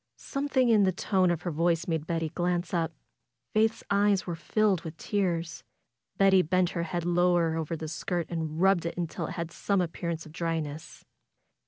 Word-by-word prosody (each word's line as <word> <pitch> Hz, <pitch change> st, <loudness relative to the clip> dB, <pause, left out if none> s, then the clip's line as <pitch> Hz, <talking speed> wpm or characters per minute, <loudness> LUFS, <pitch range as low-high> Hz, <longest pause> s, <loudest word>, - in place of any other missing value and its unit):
Something 275 Hz, -3 st, 0 dB
in 220 Hz, -2 st, +5 dB
the 190 Hz, -1 st, +4 dB
tone 185 Hz, 0 st, +1 dB
of 175 Hz, -2 st, -1 dB
her 175 Hz, -, -2 dB
voice 165 Hz, +1 st, +1 dB
made 160 Hz, -2 st, -2 dB
Betty 165 Hz, -1 st, -1 dB
glance 175 Hz, +1 st, -1 dB
up. 165 Hz, -2 st, 0 dB, 0.6 s
Faith's 220 Hz, +1 st, +2 dB
eyes 200 Hz, -1 st, +3 dB
were 175 Hz, -, -3 dB
filled 195 Hz, +2 st, +1 dB
with 160 Hz, 0 st, -8 dB
tears. 170 Hz, -8 st, -2 dB, 0.5 s
Betty 195 Hz, -1 st, +6 dB
bent 180 Hz, +2 st, +1 dB
her 170 Hz, -, -2 dB
head 170 Hz, 0 st, -3 dB
lower 175 Hz, -2 st, +2 dB
over 165 Hz, 0 st, -2 dB
the 160 Hz, 0 st, -5 dB
skirt 170 Hz, +2 st, -2 dB
and 160 Hz, -2 st, -4 dB
rubbed 190 Hz, -2 st, +3 dB
it -, -, -5 dB
till -, -, -4 dB
it -, -, -6 dB
had 170 Hz, -2 st, -4 dB
some 200 Hz, +3 st, 0 dB
appearance 170 Hz, -1 st, -3 dB
of 155 Hz, -, -12 dB
dryness. 160 Hz, -2 st, -4 dB
175 Hz, 180 wpm, -28 LUFS, 165-190 Hz, 0.6 s, Betty